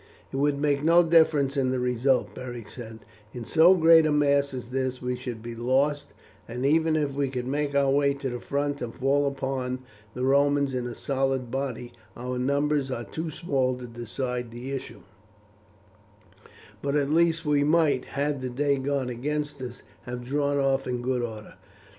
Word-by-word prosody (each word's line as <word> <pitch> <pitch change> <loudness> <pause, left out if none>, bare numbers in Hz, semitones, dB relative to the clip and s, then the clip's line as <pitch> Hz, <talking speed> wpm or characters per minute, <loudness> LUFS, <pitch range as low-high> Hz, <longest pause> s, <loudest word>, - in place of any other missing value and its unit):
"It - - -2
would 145 +1 +2
make 145 -1 +1
no 170 +2 +6
difference 160 -4 +3
in 135 -2 +1
the 130 0 0
result," 125 +1 +1
Beric 120 -4 -7
said; 115 -3 -9 0.3
"in 120 -2 -6
so 165 +9 +6
great 165 -2 +6
a - - +1
mass 140 -1 +3
as 125 -2 -7
this 130 -1 -1
we 125 0 -2
should 125 -3 -7
be 120 0 -6
lost, 130 +4 0 0.4
and 125 +3 -4
even 160 +2 +3
if 145 -3 0
we 140 -1 -1
could 125 -2 -4
make 145 +2 -1
our 140 -1 +3
way 140 0 +2
to 135 -2 -4
the 120 - -4
front, 145 +2 -2
and 120 -2 -5
fall 140 +2 +2
upon 130 -2 -3 0.3
the 125 - -3
Romans 140 0 +3
in 125 -1 -2
a 120 - -6
solid 135 -3 -1
body, 125 -3 -4 0.2
our 125 +1 -4
numbers 140 +1 +1
are 120 -2 -3
too 160 +6 -5
small 135 -5 0
to 125 - -8
decide 120 +1 -4
the 120 +3 -7
issue; 135 -2 -6 1.8
but 140 0 -1
at 145 -1 +1
least 165 0 +2
we 145 -1 +3
might, 150 -4 +2
had 140 0 -2
the 130 - -3
day 140 +3 +1
gone 135 -1 -1
against 145 +3 -3
us, 125 -1 -7 0.2
have 125 -1 -6
drawn 145 +2 0
off 135 -1 +1
in 125 -1 -2
good 125 0 0
order." 110 -3 -6
135 Hz, 185 wpm, -26 LUFS, 125-145 Hz, 1.8 s, no